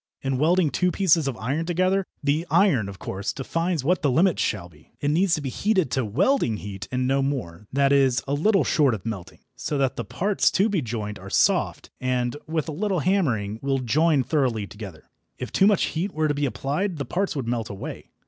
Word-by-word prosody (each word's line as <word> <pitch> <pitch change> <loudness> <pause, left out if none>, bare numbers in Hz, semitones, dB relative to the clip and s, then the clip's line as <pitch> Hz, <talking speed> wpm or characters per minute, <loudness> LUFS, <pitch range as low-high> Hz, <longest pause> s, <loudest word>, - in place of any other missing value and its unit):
In 135 -1 -1
welding 165 0 +3
two 180 -1 +1
pieces 170 -6 +3
of 130 -4 -3
iron 140 +9 -2
together, 185 +2 +1 0.2
the 150 +4 0
iron, 160 - +3
of 95 - -9
course, 100 +2 -4
defines 165 +2 -2
what 180 +5 +1
the 145 - +2
limit 165 +7 +3
shall 95 -4 -1
be. 75 -3 -22
It 145 - 0
needs 175 +3 +3
to 155 - -4
be 135 - -3
heated 190 - 0
to 130 -1 +1
"welding 125 - +1
heat" 100 -2 -7
and 125 0 0
no 135 +1 +2
more 105 -9 -3
that 140 +1 +2
is, 135 -3 +3
a 140 - -1
little 195 +7 +3
short 145 -9 +3
of 95 - -10
melting 105 -6 -6
so 150 - -3
that 135 -1 0
the - - -2
parts 200 +2 +1
to 200 +4 +3
be 195 -6 0
joined 110 -4 -4
are - - -9
soft, - - +1
and, 125 0 0
with 160 -1 -2
a - - -3
little 190 +2 -1
hammering, 120 - 0
will 135 0 0
join 140 +3 +2
thoroughly 125 -6 0
together. 100 -5 -10 0.3
If - - -6
too 195 - +4
much 205 -3 +3
heat 185 +5 -2
were 155 0 +1
to 145 - +1
be 145 0 0
applied 155 +8 -2
the 140 - -3
parts 190 +7 -1
would 130 -5 -3
melt 115 -2 -2
away. 100 - -7
140 Hz, 215 wpm, -24 LUFS, 120-175 Hz, 0.3 s, too